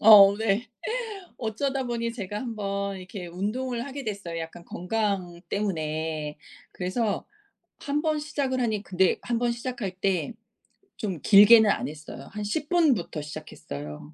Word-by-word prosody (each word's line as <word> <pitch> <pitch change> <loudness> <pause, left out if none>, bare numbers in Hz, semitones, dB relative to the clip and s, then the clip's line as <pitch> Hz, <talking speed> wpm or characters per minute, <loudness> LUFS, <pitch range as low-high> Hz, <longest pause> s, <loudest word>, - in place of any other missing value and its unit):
어 200 -2 +10
네. 220 +2 0 0.7
어쩌다 260 +4 -1
보니 235 -1 -2
제가 205 -3 -5
1 235 -3 -5
번 200 -1 -2
이렇게 185 0 -7
운동을 235 +7 -2
하게 280 0 -6
됐어요, 200 -6 -4
약간 165 +1 -8
건강 185 -3 -2
때문에. 155 -6 -2 0.3
그래서 200 +3 -1 0.6
1 290 0 0
번 310 -2 +1
시작을 275 -4 -1
하니 220 -4 0
근데 185 0 +2
1 240 -1 0
번 240 0 +1
시작할 240 -5 -4
때 195 +3 0 0.7
좀 190 - -3
길게는 210 +1 +8
안 - - +1
했어요. 150 -2 -9
한 210 - -4
10 290 +8 -2
분부터 270 - +2
시작했어요. 145 - -8
205 Hz, 260 characters per minute, -27 LUFS, 180-240 Hz, 0.7 s, 어